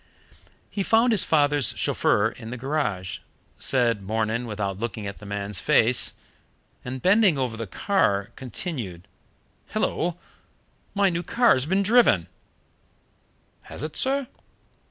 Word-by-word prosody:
He 205 - -2
found 225 +5 +3
his 210 -5 +4
father's 145 -4 +2
chauffeur 105 +2 +2
in 115 -1 -10
the 125 - -5
garage, 120 - -2 0.4
said, 120 -5 +1
"Morning" 110 +4 -1
without 100 -3 -3
looking 110 -2 -4
at 100 -1 -6
the 105 - -11
man's 100 -1 -3
face, 120 +2 +2 0.7
and, 125 +1 -6
bending 195 -4 +4
over 125 -4 -1
the 115 -1 -5
car, 100 - 0
continued: 120 - -5 0.7
"Hullo! 175 0 -1 0.8
my 200 -1 +3
new 170 0 -2
car's 175 - +3
been 190 +3 +2
driven!" 200 - +4 1.4
"Has - - -6
it, 155 0 -5
sir?" 275 +1 0
125 Hz, 125 wpm, -25 LUFS, -, 1.4 s, his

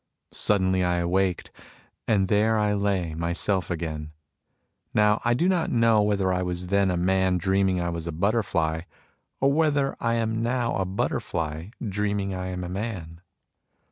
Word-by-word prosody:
Suddenly 95 -2 +2
I 90 0 +1
awaked, 90 +1 0 0.6
and 100 -3 +2
there 110 +3 +3
I 105 -1 +2
lay, 100 -5 0
myself 85 +3 -1
again. 80 -3 -4 0.8
Now 105 0 +3
I 120 0 +2
do 170 +8 +1
not 180 -3 +1
know 115 -2 +4
whether 100 -3 +1
I 90 - 0
was 90 0 -3
then 100 -1 +3
a 90 - 0
man 95 +1 +2
dreaming 95 +1 +1
I 85 0 -1
was 85 -1 -4
a - - -2
butterfly, 85 -3 0 0.6
or 135 +1 +3
whether 145 -3 +1
I 115 0 0
am 115 -1 -1
now 120 0 0
a 95 - 0
butterfly 80 -3 -2 0.2
dreaming 100 -1 -1
I 90 0 -4
am 90 0 -4
a - - -4
man. 90 -5 -5
95 Hz, 160 wpm, -25 LUFS, 90-105 Hz, 0.8 s, know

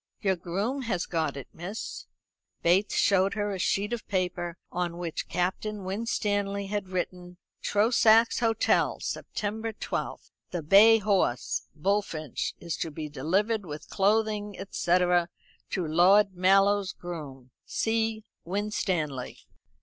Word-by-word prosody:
"Your 190 -2 +1
groom 195 +10 -2
has 210 -8 -1
got 160 -4 -1
it, 135 - -7
miss." 185 +6 -6 0.6
Bates 190 +4 +3
showed 195 +1 +3
her 205 -1 -1
a 195 - -4
sheet 205 +5 0
of 235 - -5
paper 180 -3 -2
on 175 -1 -2
which 170 -2 -4
Captain 190 +4 -2
Winstanley 200 0 -1
had 205 -2 -3
written: 180 -1 -4 0.2
"Trosachs 225 +1 +4
Hotel, 225 -2 +2
September 220 +2 -3
12. - - -5 0.2
"The 175 -3 -4
bay 210 +8 +7
horse, 195 - 0
Bullfinch, 160 - -1
is 170 -4 -4
to 165 - -2
be 155 0 -6
delivered, 200 - 0
with 150 -4 -8
clothing, 210 0 +1
&c., 175 +1 +2
to 175 -1 +3 0.6
Lord 190 +5 +5
Mallow's 195 +2 +3
groom. 140 -7 -8
"C. 225 -1 -1 0.2
WINSTANLEY." 175 -8 -2
195 Hz, 120 wpm, -28 LUFS, 175-210 Hz, 0.6 s, bay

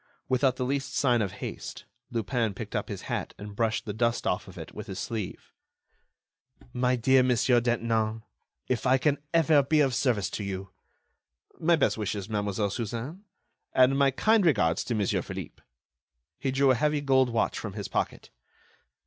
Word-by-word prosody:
Without 130 0 +2
the 130 -1 -2
least 135 +1 -2
sign 125 -4 +3
of 100 -3 -2
haste, - - -7 0.2
Lupin 115 -2 -1
picked - - -6
up - - -2
his - - -6
hat - - -4
and 105 0 -9
brushed 110 0 0
the 105 - -4
dust 115 +2 0
from - - +2
off - - -5
it - - -8
with - - -8
his - - -6
sleeve. 110 -5 -5 1.2
"My 125 0 +2
dear 130 +2 +4
Monsieur 125 -1 +3
Detinan, 115 -2 0 0.4
if 125 0 0
I 130 +1 +5
can 145 +2 +1
ever 160 -3 +5
be 150 +3 +2
of 135 -3 +3
service 115 -7 +1
to 105 - -4
you.... 95 -1 -5 0.9
My 170 +1 +4
best 155 - +1
wishes, 100 -2 -3
Mademoiselle 105 -1 -1
Suzanne, 120 - -5 0.5
and 130 +1 +5
my 140 0 +4
kind 215 +9 +3
regards 85 - +2
to 120 - -1
Monsieur 105 -3 +1
Philippe." - - -8 0.8
He 135 - -1
drew 135 +1 +4
a - - +4
heavy 150 +4 +1
gold 130 -2 +3
watch 115 -1 0
from 105 -3 -6
his 100 -2 -5
pocket. - - -3
125 Hz, 175 wpm, -28 LUFS, 110-135 Hz, 1.2 s, I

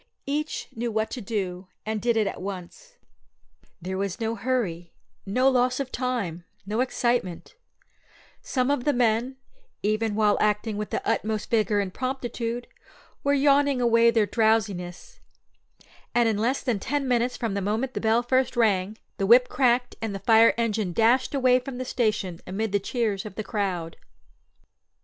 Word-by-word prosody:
Each 300 +2 -3
knew 235 +1 -2
what 220 0 -1
to 250 - -5
do, 190 -3 -4 0.2
and 215 -1 -2
did 235 -1 +1
it 215 - +3
at - - -4
once. 200 - -8 0.8
There 185 +2 -4
was 200 +1 -3
no 225 0 -1
hurry, 200 -8 -2 0.3
no 255 +7 +2
loss 255 0 +2
of 270 -2 -3
time, 230 -10 -2 0.2
no 210 +3 -2
excitement; 240 -7 -1 0.9
some 255 0 0
of 285 -4 0
the 290 - +2
men, 240 +2 +1 0.5
even 215 +1 0
while 210 -1 +3
acting 210 +1 +1
with 210 0 -4
the - - -3
utmost 215 0 -1
vigour 215 -2 +2
and 195 -2 -2
promptitude, 245 -2 -3 0.6
were 280 0 +3
yawning 280 -1 +3
away 235 -1 +4
their 225 -2 +3
drowsiness; 205 -6 -1 1.0
and 240 -1 +4
in 215 -2 0
less 245 +5 0
than 235 -6 0
ten 285 +5 -2
minutes 245 0 +1
from 230 -5 -2
the 200 - -1
moment 220 +7 -1
the - - -3
bell 225 +2 +2
first 255 0 +1
rang 210 -2 +2 0.2
the 195 - 0
whip 245 +3 +6
cracked 250 -1 +2
and 220 -3 -3
the 195 - -8
fire 225 0 +6
engine 215 -5 -1
dashed 240 - +3
away 255 -2 +4
from 255 0 -7
the 255 - -4
station 210 -8 -1
amid 205 +3 -2
the 205 - +2
cheers 210 -2 -1
of 210 -3 -9
the 215 - -4
crowd. 185 -7 -3
225 Hz, 165 wpm, -25 LUFS, 205-250 Hz, 1.0 s, whip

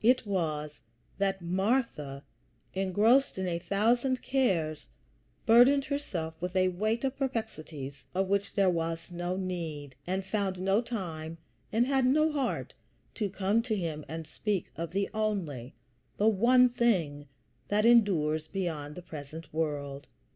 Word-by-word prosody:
It 250 +1 +4
was 155 -6 -2 0.4
that 195 -2 0
Martha, 180 - 0 0.5
engrossed 205 +8 +3
in 190 - -1
a 170 -1 -1
thousand 235 +8 +1
cares, 170 - 0 0.6
burdened 250 +5 +6
herself 205 - -3
with 180 +1 -3
a 185 0 +4
weight 215 +6 -1
of 270 0 0
perplexities 160 - -4
of 190 +1 +1
which 200 +1 0
there 200 -2 +4
was 165 0 -3
no 175 +1 -2
need, 165 -7 -4
and 190 +1 -1
found 195 -2 -1
no 195 +4 +2
time 165 -9 -5 0.3
and 230 +3 +3
had 265 -1 +2
no 305 +4 +4
heart 275 -4 -2 0.4
to 210 -4 -1
come 200 +3 +1
to 230 -2 -1
him 160 -6 -3
and 160 +2 -5
speak 190 +4 -2
of 165 0 -4
the 195 +2 0
only, 185 - -2 0.4
the 210 - +3
one 240 +4 +6
thing 185 -13 0 0.4
that 210 +1 +2
endures 165 -10 +4
beyond 160 -7 -3
the 180 - -8
present 155 0 -9
world. 145 -3 -2
190 Hz, 140 wpm, -30 LUFS, 160-225 Hz, 0.6 s, burdened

